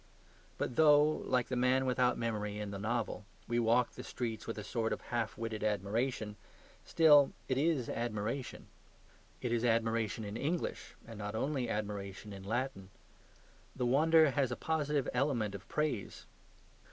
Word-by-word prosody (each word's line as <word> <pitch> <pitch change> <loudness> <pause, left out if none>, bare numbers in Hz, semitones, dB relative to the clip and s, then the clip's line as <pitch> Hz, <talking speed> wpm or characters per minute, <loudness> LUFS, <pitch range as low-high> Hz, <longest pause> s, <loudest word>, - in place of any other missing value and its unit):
But 120 - -3
though 150 -2 +7
(like 125 -5 0
the 130 - -1
man 130 +1 +3
without 125 -1 +2
memory 105 -3 -2
in 105 -1 -4
the 100 - -5
novel) 110 0 -2 0.2
we 120 +1 +1
walk 120 +1 +3
the - - -9
streets 115 -3 -4
with 115 - -4
a 105 - -5
sort 115 +1 -1
of - - -4
half 120 -2 -3
witted 110 -2 -4
admiration, 105 +2 -1 0.5
still 150 -4 +6
it 130 - 0
is 145 -3 +1
admiration. 115 +3 -3 0.8
It 120 - -1
is 120 0 +1
admiration 115 -2 +1
in 105 +2 -5
English 160 +7 -3
and 115 -2 -10
not 105 0 -4
only 130 0 -1
admiration 105 -1 -4
in 95 - -8
Latin. 110 -1 -3 0.9
The 125 - -1
wonder 155 +4 +5
has 130 -2 +1
a - - -1
positive 150 -2 0
element 125 -6 0
of 95 -2 -9
praise. 150 -10 -2
120 Hz, 155 wpm, -33 LUFS, 105-135 Hz, 0.9 s, though